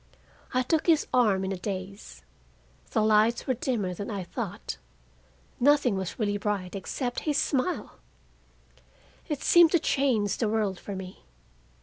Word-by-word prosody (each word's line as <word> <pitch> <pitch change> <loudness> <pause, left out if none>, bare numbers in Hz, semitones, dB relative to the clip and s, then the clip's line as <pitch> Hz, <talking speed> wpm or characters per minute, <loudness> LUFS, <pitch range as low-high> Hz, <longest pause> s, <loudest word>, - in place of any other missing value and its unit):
I 255 0 +1
took 315 +6 0
his 325 -3 +4
arm 210 -7 +3
in 190 - -2
a 195 - -2
daze. 195 +1 -6 0.7
The 220 - +1
lights 215 +2 +3
were 260 - +1
dimmer 230 -7 -2
than 200 +3 -6
I 200 -4 -3
thought; 170 - -5 0.8
nothing 275 -4 +4
was 190 -2 -4
really 205 -2 -1
bright 200 -2 -2
except 245 +6 -3
his 290 - +1
smile. 295 +6 -1 1.3
It 295 -3 -3
seemed 345 -2 +6
to 345 - +5
change 235 -10 +1
the 225 - 0
world 210 -4 0
for 200 - -6
me. 185 0 -8
215 Hz, 145 wpm, -27 LUFS, 195-260 Hz, 1.3 s, seemed